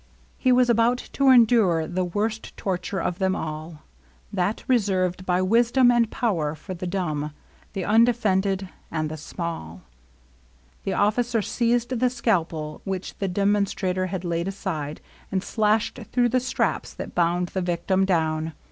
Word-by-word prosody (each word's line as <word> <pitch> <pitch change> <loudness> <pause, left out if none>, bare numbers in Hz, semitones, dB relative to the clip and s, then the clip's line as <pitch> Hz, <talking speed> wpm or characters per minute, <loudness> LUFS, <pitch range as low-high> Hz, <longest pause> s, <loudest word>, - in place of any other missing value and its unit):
He 255 - +3
was 250 0 +5
about 235 +1 +3 0.2
to 275 -1 +3
endure 225 -10 +5
the 180 +3 -1
worst 215 +5 -3
torture 190 0 -2
of 175 +1 -2
them 190 -1 +1
all, 155 0 -6 0.2
— - - -31
that 200 +2 -1
reserved 185 -6 +1
by 180 +1 +2
wisdom 240 +5 +4
and 235 -2 +3
power 170 - -1
for 185 +5 -8
the 180 0 -5
dumb, 155 -5 -2 0.4
the 195 -3 -3
undefended, 205 -4 +2 0.2
and 155 -1 -2
the - - -4
small. 150 - -6 1.0
The 195 - 0
officer 225 +2 +1
seized 240 +1 0
the 250 +1 +3
scalpel 170 -11 -1
which 190 -1 -5
the 195 - 0
demon 200 +2 +2
strator 185 -1 -2
had 185 -1 -4
laid 170 +1 -1
aside, 160 -7 -4 0.3
and 190 -1 0
flashed 215 +1 +1
through 245 -1 +3
the 255 - +2
LOVELINESS. 255 - -2
87 - - -4
straps - - -1
that - - -7
bound 175 +1 +1
the 190 - -2
victim 180 +2 0
down. 160 -3 0
190 Hz, 160 wpm, -24 LUFS, 170-225 Hz, 1.0 s, was